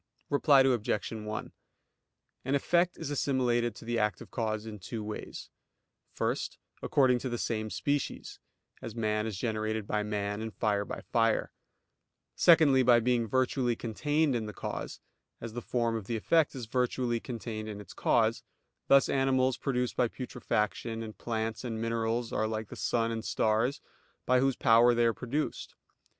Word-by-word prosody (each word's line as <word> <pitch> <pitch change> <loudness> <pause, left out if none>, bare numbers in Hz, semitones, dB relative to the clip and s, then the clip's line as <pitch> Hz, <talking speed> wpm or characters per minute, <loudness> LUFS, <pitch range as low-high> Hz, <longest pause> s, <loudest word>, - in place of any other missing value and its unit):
Reply 140 -1 +5
Obj. 120 -6 +1
1: 110 -1 -5 0.9
An 135 +2 0
effect 175 +5 +2
is 155 -3 -5
assimilated 120 -5 +1
to - - -11
the 120 0 0
active 105 0 -2
cause 110 -2 -2
in 105 -2 -7
two 105 +4 -5
ways. 105 0 -7 0.6
First, - - -2 0.2
according 130 -3 +3
to 130 - -4
the 120 - -2
same 110 -2 -2
species; 145 +5 -2 0.4
as 115 - -7
man 110 -1 0
is 105 -4 -4
generated 110 0 -2
by 105 +1 -1
man, 105 0 -2
and 110 -1 -6
fire 100 -2 0
by - - -6
fire. 115 -1 +1 0.8
Secondly, 155 -6 +6
by 120 -1 +6
being 120 -1 +1
virtually 130 0 +1
contained 145 +6 0
in 110 -2 -2
the 105 - -6
cause; - - -5 0.4
as 115 -1 -7
the 120 - -4
form 115 -2 0
of 110 -3 -5
the 115 - -1
effect 160 +7 +2
is 125 -3 -5
virtually 125 0 0
contained 110 -3 -5
in 105 -1 -6
its 105 - -11
cause: - - +2 0.5
thus 140 0 +6
animals 130 -1 +2
produced 125 -3 -1
by 125 - +2
putrefaction, 115 -2 -2
and 110 -1 -9
plants, 110 -1 -3
and 115 -3 -4
minerals 115 +1 -1
are 110 +1 +1
like 110 -1 -4
the - - -8
sun 115 -1 0
and 110 -1 -3
stars, 115 +6 +1 0.4
by 125 0 +4
whose 135 0 +2
power 120 +2 +5
they 120 0 +3
are 115 - +3
produced. 125 +9 -3
115 Hz, 165 wpm, -30 LUFS, 110-130 Hz, 0.9 s, Secondly